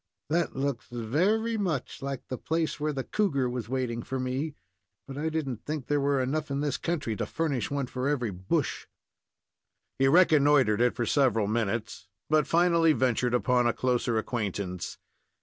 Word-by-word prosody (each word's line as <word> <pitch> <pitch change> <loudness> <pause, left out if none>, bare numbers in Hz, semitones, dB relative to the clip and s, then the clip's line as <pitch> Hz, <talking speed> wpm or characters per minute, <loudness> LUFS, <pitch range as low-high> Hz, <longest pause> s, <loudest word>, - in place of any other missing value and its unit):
"That 170 +1 +1
looks 135 -2 -2
very 185 - 0
much 175 - -2
like 135 -1 -4
the 130 - -4
place 160 -1 -1
where 150 +1 0
the 135 -2 -3
cougar 145 -11 0
was 120 -2 -4
waiting 125 -3 -2
for 130 +2 -4
me, 130 +4 -2 0.5
but 135 - -7
I 155 +3 -1
didn't 140 -7 -3
think 150 -3 -4
there 145 0 +1
were 140 -1 +2
enough 150 +4 -2
in 140 0 -1
this 145 -3 -1
country 150 -10 -2
to - - -2
furnish 145 -8 -1
one 140 -1 -1
for 125 +2 -2
every 125 -7 0
bush." 95 +1 -2 1.1
He 135 - +4
reconnoitered 145 - +5
it 125 0 +3
for 120 - -1
several 120 -7 +2
minutes, 105 -3 -2 0.2
but 155 -2 +4
finally 170 -1 +4
ventured 125 -2 +1
upon 125 0 +2
a 120 - +2
closer 120 -2 0
acquaintance. 100 -5 -3
135 Hz, 165 wpm, -28 LUFS, 120-155 Hz, 1.1 s, reconnoitered